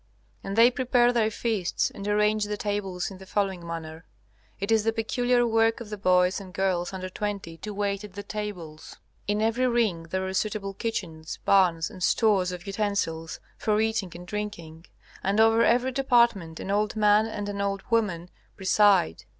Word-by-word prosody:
And 195 - -4
they 230 +2 +6
prepare 245 -1 +2
their 225 -2 +2
feasts 215 -4 -1
and 200 0 -7
arrange 210 0 +2
the 210 0 -3
tables 200 -3 -3
in 190 - -10
the 190 - -12
following 195 -4 -1
manner. 160 -1 -6 0.6
It 200 +2 -2
is 220 -1 +4
the 225 - +2
peculiar 245 +2 +1
work 225 0 +2
of 225 -3 -9
the 210 - -4
boys 180 0 +3
and 185 -2 -12
girls 185 -2 0
under 185 -1 -5
twenty 195 -3 -5
to 210 - -7
wait 200 0 -2
at 205 -2 -10
the 205 +1 -7
tables. 200 -7 -7 0.3
In 210 +1 0
every 235 +3 +2
ring 215 -9 0
there 190 +1 -2
are 190 - -4
suitable 195 0 -2
kitchens, 175 -7 -5
barns, 175 -5 +3
and 185 - -11
stores 195 -2 +2
of 180 -1 -8
utensils 195 -6 -2 0.2
for 210 -1 +1
eating 220 -4 0
and 175 +1 -9
drinking, 175 -5 -6 0.4
and 200 +2 +1
over 225 +1 +5
every 245 +3 +3
department 235 -11 +2
an 195 - -4
old 210 +1 0
man 210 0 +4
and 205 -2 -5
an 200 0 -3
old 195 -1 -2
woman 185 -7 0 0.3
preside. 190 - +3
205 Hz, 180 wpm, -26 LUFS, 185-220 Hz, 0.6 s, they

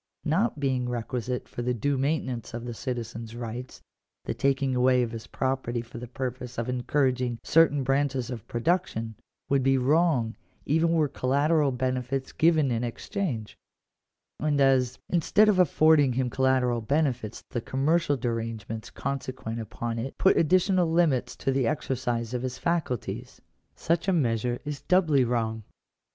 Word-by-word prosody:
Not 165 +2 +1
being 130 -3 0
requisite 125 +1 -3
for - - -6
the 125 +1 0
due 140 +5 0
maintenance 130 -5 -2
of 120 0 -5
the 120 - -4
citizen's 115 -2 -5
rights, 120 +2 -7 0.4
the - - -2
taking 135 -1 +1
away 125 0 +4
of 115 - -3
his 110 -1 -7
property 130 -2 -2
for 120 0 -10
the 125 - -7
purpose 125 0 -5
of 115 +1 -2
encouraging 125 -1 0
certain 150 -3 +4
branches 135 -2 0
of 115 -3 -7
production, 120 -5 -1 0.3
would 140 -1 +2
be 135 +1 +3
wrong 130 -4 +2 0.3
even 165 +3 +2
were 155 -3 +3
collateral 145 +3 +2
benefits 130 +1 -2
given 155 -4 +3
in 115 0 -1
exchange; 120 - -4 0.8
and 150 -1 +1
as, 130 -2 +3
instead 180 +5 +3
of 200 -3 +3
affording 155 -6 +4
him 125 0 -1
collateral 130 -2 +2
benefits, 125 -3 -1
the 120 - -2
commercial 145 +4 +1
derange 115 -3 -3
ments 110 0 -6
consequent 130 -4 -4
upon 115 +1 -4
it 130 +4 -5
put 190 - +4
additional 180 +1 +3
limits 145 -8 +2
to 135 - -1
the 135 -2 +1
exer 140 -1 -1
cise 120 -2 -2
of 125 - -1
his 130 0 -4
faculties, 165 -9 -2 0.4
such 170 +3 0
a 190 - +3
measure 120 -5 +1
is 145 -2 -5
doubly 155 -4 +3
wrong. 115 -2 -1
130 Hz, 155 wpm, -27 LUFS, 120-150 Hz, 0.8 s, away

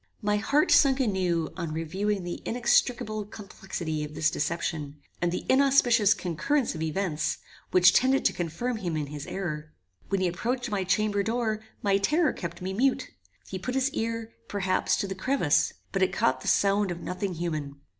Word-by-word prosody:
My 210 0 +2
heart 280 +8 +2
sunk 275 -2 +5
anew 185 -9 0
on 170 -4 -4
viewing 195 +4 -1
the 175 0 -5
inextricable 235 -2 +1
complexity 185 -6 -5
of 150 0 -7
this 155 0 +2
deception, 155 -2 -2 0.3
and 175 0 +1
the 180 - -4
inauspicious 255 -6 +4
concurrence 230 - 0
of 160 - -6
events, 160 0 -1 0.3
which 180 0 +6
tended 265 +1 +3
to - - +4
confirm 180 +9 -3
him 175 -6 -3
in 150 - -1
his 145 0 -7
error. 155 -5 -5 0.3
When 195 - +1
he 185 - +2
approached 240 +8 -2
my 200 -2 0
chamber 205 +1 +1
door, 220 0 -1 0.2
my 200 -1 +3
terror 305 - +2
kept 175 0 -6
me 190 +1 -3
mute. 260 +6 +1 0.4
He 190 - -5
put 250 +8 -4
his 265 +1 +1
ear, 230 -1 -3
perhaps, 195 -2 +1
to 200 - -2
the 190 - -3
crevice, 190 - +1 0.2
but 195 - -1
it 190 - +3
caught 130 0 +1
the - - -8
sound 200 0 +3
of 175 -1 -5
nothing 185 +1 -3
human. 155 -4 -3
195 Hz, 175 wpm, -27 LUFS, 170-230 Hz, 0.4 s, which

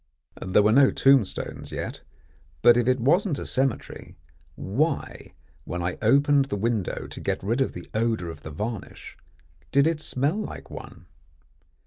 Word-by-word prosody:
There 95 +2 +3
were 105 - +4
no 135 +3 +6
tombstones 135 -7 +1
yet, - - -5 0.6
but 120 - +8
if 120 0 +1
it 130 0 +2
wasn't 160 - +2
a - - -5
cemetery, 130 -2 -2 0.4
why, 145 - -2 0.3
when 90 +2 -4
I 90 +1 -3
opened 140 +4 +4
the 135 - -4
window 110 -1 -2
to - - -9
get - - -2
rid 115 +7 0
of 135 - 0
the 90 - -9
odour 110 -6 -1
of 80 -2 -12
the 75 - -8
varnish, 105 +7 -6 0.6
did 140 +1 +4
it 160 -1 0
smell 145 +6 -1
like 215 - -7
one? - - -10
120 Hz, 155 wpm, -25 LUFS, 105-140 Hz, 0.6 s, but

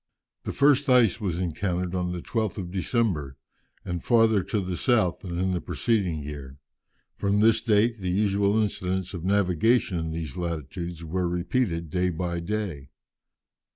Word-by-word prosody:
The - - -2
first 140 0 +3
ice 120 -4 +4
was 90 -4 -2
encountered 90 +1 -2
on 90 -1 -1
the 90 -1 -5
12th 110 -4 -2
of 90 -3 -5
December, 95 - -1 0.5
and 90 -1 -4
farther 115 -4 +4
to 105 - -1
the 90 -2 -3
south 110 -5 +2
than 85 -3 -6
in 95 +1 0
the 90 -2 -1
preceding 95 -10 -1
year. 70 -2 -8 0.6
From 100 +1 +1
this 110 +1 +4
date, 115 0 +2
the 95 -2 -3
usual 100 +2 +2
incidents 95 -3 -2
of 85 -3 -6
navigation 95 +1 +2
in 80 0 -3
these 80 -4 -5
latitudes 85 0 -4
were 90 +2 -1
repeated 85 - -1
day 90 +1 +1
by 85 0 -2
day. 85 -7 -4
90 Hz, 155 wpm, -26 LUFS, 85-105 Hz, 0.6 s, ice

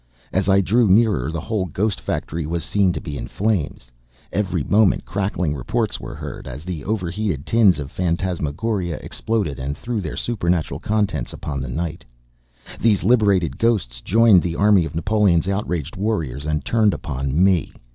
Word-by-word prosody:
As 95 +1 +1
I 100 0 +5
drew 110 +5 +3
nearer, 100 -5 +3
the 85 - -3
whole 95 +4 -2
ghost 100 +4 -2
factory 80 -1 -3
was 85 +1 -2
seen 100 -3 +2
to - - -3
be 75 -1 -6
in - - -5
flames; 80 - -2 0.4
every 95 -6 0
moment 105 +2 +3
crackling 95 -6 -1
reports 65 -4 -2
were - - -7
heard, - - -7
as 70 +6 -8
the 85 -6 -5
over 95 -4 -2
heated 90 -8 -2
tins 110 -6 +4
of 70 -1 -6
phantasmagoria 90 +1 -1
exploded 105 -12 -2
and 70 +3 -4
threw 115 0 -3
their - - -5
supernatural 90 -8 -1
contents 100 - -1
upon 70 -3 -4
the 65 - -5
night. 80 +5 -4 0.8
These 110 -4 +2
liberated 100 -6 +3
ghosts 90 - 0
joined 110 - +5
the 85 -1 -3
army 100 -3 +4
of 80 - -7
Napoleon's 90 0 +2
outraged 90 -6 -2
warriors, 80 - -2
and 75 -2 -1
turned 110 -5 +3
upon 70 -1 -3
me. 95 -3 +2
90 Hz, 165 wpm, -21 LUFS, 75-105 Hz, 0.8 s, I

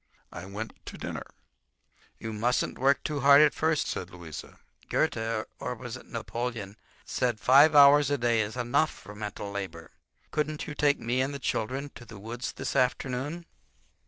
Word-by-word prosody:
I 85 +2 -8
went 105 +3 -6
to - - -7
dinner. - - -5 0.9
"You 110 -1 -6
mustn't 120 +4 0
work 135 +2 +3
too 150 -2 -2
hard 140 +1 +7
at 150 -1 +5
first," 155 -1 +1
said 90 - -4
Louisa. 85 -4 -9 0.3
"Goethe—or 110 -1 -1
was - - -7
it - - -12
Napoleon?—said 115 +1 -4
five 140 +7 +6
hours 145 0 +8
a 145 - +1
day 120 -2 +2
is 110 +3 -4
enough 125 +6 +2
for 100 - -12
mental 105 -1 -6
labor. 95 -5 -6 0.4
Couldn't 150 0 -2
you 150 - -6
take 145 -1 +3
me 120 +3 0
and 140 +2 -1
the - - -2
children 135 +2 -2
to - - -11
the 110 - -11
woods 115 +5 -5
this - - -4
afternoon?" 135 +6 0
125 Hz, 160 wpm, -28 LUFS, 110-140 Hz, 0.9 s, hours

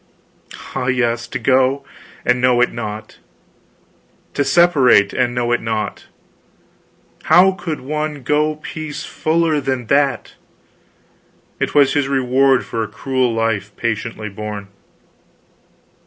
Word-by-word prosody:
Ah, 125 - -2
yes, 120 -2 0
to 125 - -4
go, 130 +2 +2 0.4
and 125 0 +2
know 125 -1 +3
it 125 - +3
not; 110 -1 -7 1.1
to 140 - +1
separate 135 -9 +4
and 125 -1 0
know 120 -1 0
it 120 - +1
not; 110 -1 -4 1.2
how 185 +2 +6
could 170 -4 -5
one 150 +1 -4
go 150 +3 +1
peace 155 0 -7
fuller 160 -1 0
than 130 -2 -2
that? 140 -1 +1 1.3
It - - -2
was 140 -2 +5
his 145 -2 +1
reward 135 0 +2
for 115 - -3
a 110 - -2
cruel 130 +4 -1
life 110 -3 -2
patiently 115 -1 -3
borne." 105 -1 -7
130 Hz, 120 wpm, -18 LUFS, 115-145 Hz, 1.3 s, how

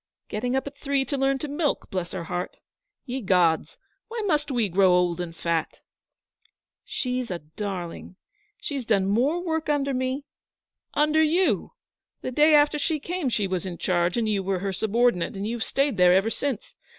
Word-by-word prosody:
'Getting 245 +4 -1
up 265 - 0
at 280 0 -7
three 280 -2 0
to 285 - -2
learn 270 0 +2
to 300 - -4
milk, 295 +1 -1
bless 180 -2 -3
her 185 -3 -4
heart! 175 +1 -4 0.5
Ye 260 0 -3
gods, 180 -5 +2 0.3
why 455 -1 -4
must 300 -5 +1
we 240 -5 +1
grow 190 +1 +4
old 180 -1 +2
and 165 -2 -6
fat?' 165 -1 -2 1.0
'She's 250 -2 -2
a 180 - -2
darling. 175 +2 -6 0.4
She - - -4
has 275 -3 -2
done 200 -4 +3
more 250 - +2
work 320 -2 -1
under 280 -2 +1
me 260 +2 -2 0.3
' - - -61
'Under 305 +1 +4
you! 335 +4 +2 0.5
The - - -3
day 300 +4 +5
after 295 0 +4
she 310 +1 0
came 340 -1 -2
she 215 -4 0
was 185 -2 -2
in 180 -2 -5
charge 175 +3 +1
and 230 -2 +1
you 205 -2 +1
were 190 0 -1
her 195 +1 -2
subordinate, 220 -1 +1
and 195 +1 -3
you've 230 +1 -2
stayed 275 -5 0
there 180 0 +6
ever 200 +4 +2
since. 270 -5 -3
240 Hz, 185 wpm, -25 LUFS, 185-285 Hz, 1.0 s, there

